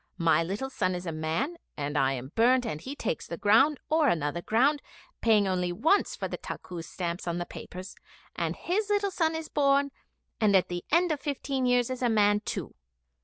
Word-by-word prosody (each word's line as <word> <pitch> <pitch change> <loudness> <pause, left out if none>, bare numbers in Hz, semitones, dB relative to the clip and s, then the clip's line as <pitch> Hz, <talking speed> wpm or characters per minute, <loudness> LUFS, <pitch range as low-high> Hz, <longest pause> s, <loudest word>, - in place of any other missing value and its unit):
My 165 -2 +3
little 205 +11 -3
son 185 -7 0
is 180 +1 -6
a 165 - -2
man, 160 - -2 0.2
and 145 0 -3
I 135 -2 +2
am 130 +1 -6
burnt, 245 +2 +4
and 155 -9 -4
he 275 +8 -6
takes 225 - -3
the 170 - -5
ground 230 - +4
or 315 -1 +3
another 165 - 0
ground, 275 +9 +2 0.4
paying 215 -3 +4
only 180 -1 0
once 315 - +2
for - - -3
the - - -6
takkus 170 -3 -7
stamps 175 -1 -4
on 170 0 -1
the 175 - -3
papers, 185 +2 -9 0.4
and - - -2
his 410 +4 -1
little 405 -1 +1
son 325 -3 +1
is 320 -1 -4
born, 280 -1 +2 0.5
and 210 -3 +4
at 185 - +3
the 175 0 -4
end 345 +2 +4
of 300 - -1
fifteen 275 -3 -2
years 245 0 +2
is 255 - -4
a 245 - +2
man 205 -2 +4
too. 210 - -5
220 Hz, 205 wpm, -28 LUFS, 175-280 Hz, 0.5 s, burnt